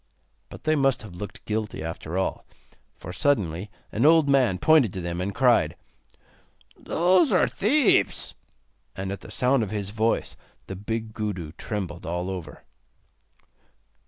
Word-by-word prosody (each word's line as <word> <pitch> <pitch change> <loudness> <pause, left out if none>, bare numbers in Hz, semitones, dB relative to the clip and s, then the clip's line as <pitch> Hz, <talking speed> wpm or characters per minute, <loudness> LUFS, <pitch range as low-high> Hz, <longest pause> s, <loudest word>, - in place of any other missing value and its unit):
But - - -11
they 155 0 +2
must 135 -4 +2
have 105 - -10
looked 100 +3 -8
guilty 105 -5 -3
after 80 +1 -5
all, 95 - -1 0.5
for 90 - -8
suddenly 100 - 0 0.2
an 110 - -1
old 160 0 +6
man 130 -9 +3
pointed 150 - +4
to 95 - -4
them, 85 0 -3
and 95 +2 -2
cried: 125 +4 +3 1.0
'Those 175 -1 +2
are - - +4
thieves.' 255 +4 +2 0.6
And 95 0 -4
at 100 - -6
the - - -12
sound 130 +1 +2
of 110 - -2
his 100 -1 -3
voice 110 +1 0 0.3
the 95 - -6
big 110 +3 -4
Gudu 95 -8 -4
trembled 90 -1 -5
all 90 +2 -2
over. 85 -5 -8
105 Hz, 145 wpm, -25 LUFS, 90-135 Hz, 1.0 s, old